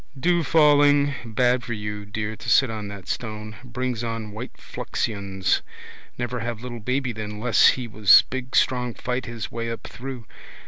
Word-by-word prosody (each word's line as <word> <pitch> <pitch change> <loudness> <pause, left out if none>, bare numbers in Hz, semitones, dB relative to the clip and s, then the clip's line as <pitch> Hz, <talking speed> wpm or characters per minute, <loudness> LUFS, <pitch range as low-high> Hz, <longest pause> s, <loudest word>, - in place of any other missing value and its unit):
Dew 175 +5 +3
falling. 145 -2 +5
Bad 120 +2 +1
for 120 - -4
you, 105 -1 -5
dear, 105 +1 -3
to - - -6
sit 130 -4 +5
on 105 -2 -5
that 100 -2 -9
stone. 110 -2 -5
Brings 125 -1 -3
on 115 -2 -4
white 110 +5 -8
fluxions. 100 -3 -2 0.6
Never 120 0 -3
have 115 -1 -4
little 120 -2 -6
baby 125 +3 -1
then 105 -1 -6
less 115 0 +5
he 125 -2 +2
was 105 -3 +7
big 130 0 -4
strong 125 -2 +2
fight 125 0 -3
his 115 -3 -6
way 115 0 -3
up 115 - -5
through. 125 -2 -7
120 Hz, 170 wpm, -24 LUFS, 110-125 Hz, 0.6 s, was